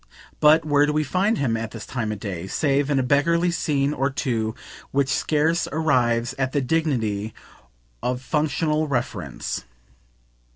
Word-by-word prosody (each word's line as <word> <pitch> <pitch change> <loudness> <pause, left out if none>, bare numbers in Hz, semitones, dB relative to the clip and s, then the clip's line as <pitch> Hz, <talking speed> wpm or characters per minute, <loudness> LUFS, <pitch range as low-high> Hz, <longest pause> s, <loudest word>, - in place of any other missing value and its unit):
But 155 +1 +5
where 145 -1 +3
do 150 - 0
we 155 0 +1
find 195 +8 +1
him, 120 -5 0
at 115 0 -3
this 110 -2 -8
time 115 -4 -3
of 105 - -5
day, 95 -4 -5
save 140 +4 +1
in 145 - +2
a 130 - +2
beggarly 170 +6 +2
scene 145 -4 0
or 135 0 0
two 115 -6 -2 0.3
which 140 -1 +1
scarce 160 +4 +1
arrives 125 -6 +1
at 130 -1 0
the 145 - +2
dignity 120 -8 -1 0.7
of 125 0 -1
functional 150 +2 0
reference? 110 - -3
140 Hz, 155 wpm, -23 LUFS, 120-155 Hz, 0.7 s, But